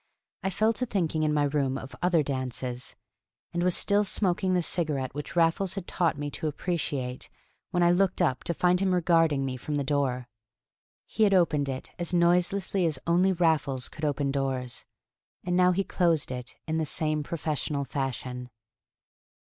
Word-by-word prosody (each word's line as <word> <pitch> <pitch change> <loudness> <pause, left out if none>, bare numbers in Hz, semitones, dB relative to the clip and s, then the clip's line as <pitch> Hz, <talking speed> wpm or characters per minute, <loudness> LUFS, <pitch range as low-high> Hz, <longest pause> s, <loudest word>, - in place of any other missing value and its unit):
I 190 - -1
fell 215 +4 +2
to 250 +3 -2
thinking 170 -7 0
in 155 -1 +2
my 150 -1 +2
room 140 -2 0
of 135 0 -9
other 175 -3 +3
dances... 130 -2 -3 0.6
and 175 - 0
was 180 0 +2
still 205 +1 +3
smoking 190 -2 +1
the 180 - +2
cigarette 150 -7 -1
which 150 +4 -6
Raffles 170 +3 +2
had 195 -3 -5
taught 170 -5 0
me 145 0 -4
to 155 - -3
appreciate 145 -5 -3 0.4
when 175 -2 +1
I 175 - +5
looked 190 +1 +2
up 140 -8 +1
to 170 - -1
find 180 +2 +3
him 190 -1 +2
regarding 165 -5 +3
me 130 -1 -3
from 150 +4 -4
the 145 - 0
door. 135 -3 0 0.8
He - - -5
had 200 -2 +5
opened 150 -6 +2
it 130 -1 -5
as 175 +1 -2
noiselessly 180 +2 +2
as 155 -4 -1
only 180 +3 +3
Raffles 150 -7 +1
could 155 - -11
open 145 -2 0
doors, 135 -3 -3 0.6
and 180 0 0
now 180 0 +5
he 195 +2 +1
closed 170 -8 +1
it 125 0 -6
in 160 0 0
the 160 - 0
same 155 +1 0
professional 150 -2 -2
fashion. 125 -2 -4
160 Hz, 175 wpm, -28 LUFS, 135-180 Hz, 0.8 s, I